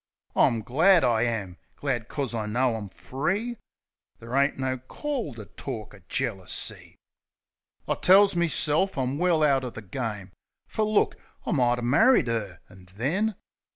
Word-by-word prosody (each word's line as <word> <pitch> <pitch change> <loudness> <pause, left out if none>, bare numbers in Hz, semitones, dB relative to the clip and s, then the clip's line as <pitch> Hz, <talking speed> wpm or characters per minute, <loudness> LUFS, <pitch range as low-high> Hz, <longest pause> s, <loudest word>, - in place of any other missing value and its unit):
I'm 115 -2 +3
glad, 165 - +4
I 115 -2 +3
am 105 -6 -3
— - - -40
glad 120 -5 -2
'cos 140 -5 -3
I 110 -2 -2
know 120 +2 +1
I'm 105 -3 -6
free! 190 - -3 0.6
There 115 +1 -10
ain't 140 +1 +2
no 130 -1 -2
call 235 - -4
to 110 -2 -8
tork 110 -1 -7
o' 100 - -14
jealousy. 110 -9 -2 0.9
I - - +2
tells 195 +1 +5
meself 170 +1 +1
I'm 130 +2 -1
well 175 -3 +3
out 135 -3 +3
o' 125 - -3
the 110 -2 -9
game; 105 -2 -5 0.3
Fer - - -4
look, 215 -1 +2 0.3
I - - -2
mighter 120 -5 +2
married 140 - +4
'er 105 -6 -3
— - - -39
an' 90 0 -17
then... 185 - 0
130 Hz, 160 wpm, -26 LUFS, 115-165 Hz, 0.9 s, tells